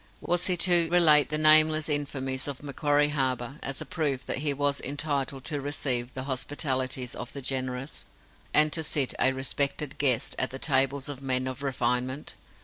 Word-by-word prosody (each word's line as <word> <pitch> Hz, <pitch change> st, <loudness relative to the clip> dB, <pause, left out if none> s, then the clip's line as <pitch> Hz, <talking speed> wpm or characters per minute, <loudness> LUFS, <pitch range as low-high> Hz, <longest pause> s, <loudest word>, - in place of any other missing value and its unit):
Was 175 Hz, +1 st, 0 dB
he 180 Hz, -2 st, +1 dB
to 175 Hz, -2 st, +4 dB
relate 160 Hz, -4 st, +5 dB
the 150 Hz, -, +1 dB
nameless 155 Hz, 0 st, +5 dB
infamies 135 Hz, -3 st, -2 dB
of 140 Hz, -1 st, -7 dB
Macquarie 145 Hz, +1 st, 0 dB
Harbour 130 Hz, -1 st, -2 dB
as 135 Hz, 0 st, -5 dB
a -, -, -6 dB
proof 140 Hz, -6 st, -3 dB
that -, -, -2 dB
he 145 Hz, 0 st, 0 dB
was 140 Hz, 0 st, -1 dB
entitled 140 Hz, -2 st, -3 dB
to 145 Hz, -2 st, -4 dB
receive 130 Hz, -3 st, -1 dB
the 130 Hz, -, -4 dB
hospitalities 130 Hz, -1 st, -3 dB
of 120 Hz, -, -8 dB
the 140 Hz, -, -7 dB
generous, 130 Hz, +1 st, -4 dB, 0.5 s
and 150 Hz, 0 st, +5 dB
to 160 Hz, -, -1 dB
sit, 145 Hz, -3 st, +1 dB
a 130 Hz, -, +3 dB
respected 135 Hz, +2 st, -2 dB
guest, 130 Hz, -5 st, +3 dB
at -, -, +1 dB
the 135 Hz, -, -7 dB
tables 135 Hz, 0 st, 0 dB
of 140 Hz, -2 st, -6 dB
men 130 Hz, -1 st, 0 dB
of 130 Hz, +1 st, -6 dB
refinement? 130 Hz, 0 st, -2 dB
140 Hz, 175 wpm, -26 LUFS, 130-150 Hz, 0.5 s, relate